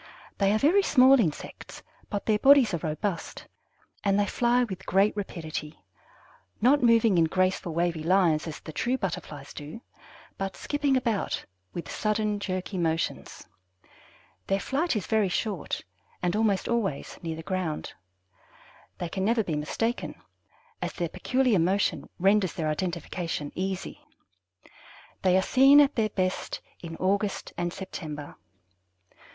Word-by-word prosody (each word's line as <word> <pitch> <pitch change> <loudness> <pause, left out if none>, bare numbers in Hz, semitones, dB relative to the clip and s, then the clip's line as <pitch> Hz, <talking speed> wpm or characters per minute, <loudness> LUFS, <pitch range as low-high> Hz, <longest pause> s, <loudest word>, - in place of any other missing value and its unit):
They 200 -1 +3
are 215 - +3
very 325 - +4
small 265 -6 +6
insects, 165 -10 -3 0.3
but 205 -2 -3
their 215 -1 +2
bodies 270 -5 +6
are 170 - 0
robust, 165 +4 -3 0.6
and 200 0 +2
they 205 - +3
fly 240 +4 +2
with 190 -5 -6
great 195 +3 +3
rapidity, 160 - -6 0.8
not 270 +6 +4
moving 230 -5 +4
in 165 - +5
graceful, 185 -1 0
wavy 170 -1 0
lines 170 -3 +3
as 155 - -6
the 155 - -10
true 250 - 0
Butterflies 150 - -5
do, 150 +9 -8 0.6
but 195 0 -3
skipping 290 -2 +1
about 230 -5 -1 0.3
with 170 - -5
sudden, 215 -1 0
jerky 185 -1 -3
motions. 165 -1 -2 1.0
Their 195 - +1
flight 285 - 0
is 210 - -2
very 215 -3 +2
short, 195 -2 -2 0.4
and 175 +1 +1
almost 210 -3 +1
always 210 -11 -2
near 165 -2 -4
the 160 - -8
ground. 165 -2 -3 1.0
They 175 - -3
can 190 +3 -3
never 225 +2 +2
be 165 -6 -2
mistaken, 225 +11 -2 0.7
as - - -3
their 170 -2 -2
peculiar 250 +1 +1
motion 190 +4 +1
renders 195 0 +3
their 155 -2 -2
identification 170 -2 -3
easy. 190 0 -4 1.2
They 185 -1 +4
are 190 - +2
seen 270 +6 +6
at 290 -1 +5
their 220 -2 +1
best 185 -2 -2 0.2
in 165 -1 -7
August 200 +2 -1
and 175 0 -2
September. 155 -6 -7
195 Hz, 140 wpm, -27 LUFS, 170-225 Hz, 1.2 s, small